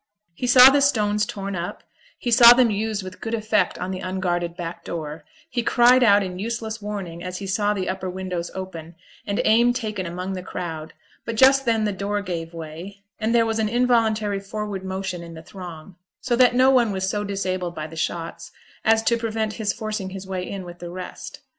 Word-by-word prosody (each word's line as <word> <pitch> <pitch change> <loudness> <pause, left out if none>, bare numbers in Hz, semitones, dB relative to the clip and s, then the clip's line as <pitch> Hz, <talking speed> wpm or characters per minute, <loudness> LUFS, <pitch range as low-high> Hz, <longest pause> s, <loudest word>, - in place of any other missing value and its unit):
He 250 +9 -3
saw 250 +2 +9
the 285 +1 +3
stones 210 -6 +2
torn 195 -1 -5
up; 175 0 -5 0.3
he 240 - -3
saw 235 0 +10
them 245 -2 +4
used 210 0 -2
with 185 0 -10
good 225 +1 -2
effect 215 -1 0
on 185 - -4
the 185 - -4
unguarded 175 -2 -2
back 170 0 -6
door; 155 -2 -6 0.2
he 240 - -2
cried 245 +2 +5
out 205 -4 +5
in 180 -1 -6
useless 220 0 -4
warning 190 -5 -6
as 180 0 -5
he 200 - -6
saw 205 +2 +1
the 190 -2 -3
upper 185 0 -3
windows 180 -2 -4
open, 170 -3 -7 0.3
and 200 0 -1
aim 235 +2 +4
taken 215 -7 -3
among 180 +3 -4
the 185 - -4
crowd; 160 -3 -6 0.3
but 230 - -4
just 270 +3 +5
then 225 -2 +2
the 210 - +1
door 200 +1 -2
gave 165 -3 -4
way, 170 +5 -9 0.2
and 225 +1 0
there 230 -1 +4
was 225 0 -1
an 215 -1 +1
involuntary 220 -4 +2
forward 200 -1 -5
motion 190 -1 -4
in 170 -1 -10
the 160 - -10
throng, 175 -1 -10 0.2
so 245 - 0
that 245 0 +5
no 260 +1 +5
one 240 -5 +3
was 190 -1 -2
so 205 +1 -1
disabled 185 -3 -3
by 155 - -4
the 160 +1 -10
shots 165 +1 -4 0.3
as 225 0 +3
to 235 +1 +2
prevent 220 -1 -2
his 215 -3 -1
forcing 215 -2 -4
his 190 0 -8
way 185 -1 -4
in 195 -2 -6
with 175 0 -10
the 175 - -7
rest. 185 +1 -8
200 Hz, 210 wpm, -23 LUFS, 180-225 Hz, 0.3 s, saw